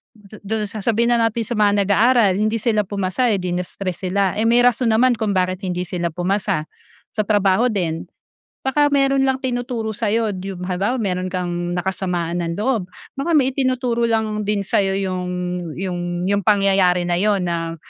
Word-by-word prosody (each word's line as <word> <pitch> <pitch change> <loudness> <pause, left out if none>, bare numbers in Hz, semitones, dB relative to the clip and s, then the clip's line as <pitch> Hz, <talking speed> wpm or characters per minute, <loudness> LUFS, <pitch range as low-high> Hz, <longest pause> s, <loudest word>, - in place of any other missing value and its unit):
du 210 -1 -15
do'n 215 +1 -2
sa 210 +1 -6
sabihin 235 +3 +2
na 235 - +2
natin 225 0 -3
sa 240 - -3
mga 205 -2 +3
nag-aaral, 215 0 +4
hindi 215 +3 0
sila 215 -1 +1
pumasa, 200 +4 -1
eh, 205 - +2
di 180 -1 -3
na-stress 180 0 -4
sila, 195 -1 +1
eh, 220 +2 0
may 245 +1 +5
rason 245 0 +3
naman 245 +3 +4
kung 215 -4 -1
bakit 185 +1 0
hindi 180 -1 -3
sila 175 -1 -2
pumasa. 180 -2 -1 0.5
Sa 215 - 0
trabaho 205 +3 +3
din, 170 -6 -2 0.6
baka 290 +2 +2
mayro'n 275 -1 +3
lang 265 0 +1
tinuturo 245 -3 -2
sa'yo. 225 0 0
Yung 185 -2 -6
halimbawa 195 +7 -1
mayro'n 185 -3 -1
kang 175 -1 -3
nakasamaan 175 -2 -2
ng 165 - -2
loob, 215 -4 0 0.3
baka 275 +5 -1
may 265 -1 +3
itinuturo 255 -3 0
lang 220 -1 0
din 205 -1 0
sa'yo 195 0 +1
yung 185 -2 -3 0.5
yung 175 -1 -3
yung 200 0 +2
pangyayari 195 -3 +3
na 175 - 0
yun 205 +1 +2
na 165 -1 -2
205 Hz, 180 wpm, -20 LUFS, 180-230 Hz, 0.6 s, may